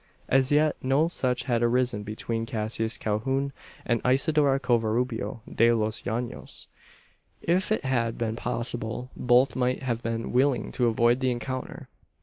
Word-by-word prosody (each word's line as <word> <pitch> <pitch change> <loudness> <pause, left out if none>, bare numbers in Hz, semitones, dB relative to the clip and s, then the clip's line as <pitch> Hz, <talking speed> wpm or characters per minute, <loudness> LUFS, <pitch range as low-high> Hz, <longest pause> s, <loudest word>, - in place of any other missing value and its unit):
As 135 +1 +3
yet 150 +1 +3
no 135 +5 +2
such 125 -7 -1
had 120 -4 0
arisen 120 -2 +1
between 115 +2 -4
Cassius 110 0 -2
Calhoun 135 +6 -1 0.3
and 120 -2 +1
Isidora 140 +1 +3
Covarubio 120 0 0
de 115 +1 +3
los 110 -1 -1
Llanos. 120 +2 -5 0.7
If 180 +5 +1
it 215 - 0
had 120 -3 0
been 110 -1 -2
possible, 120 +1 -3
both 125 +2 +3
might 125 +1 0
have 120 -3 -1
been 115 -1 -3
willing 130 0 +2
to 125 -2 +1
avoid 120 +2 +3
the 130 -1 +1
encounter. 130 +1 -5
125 Hz, 140 wpm, -27 LUFS, 115-130 Hz, 0.7 s, As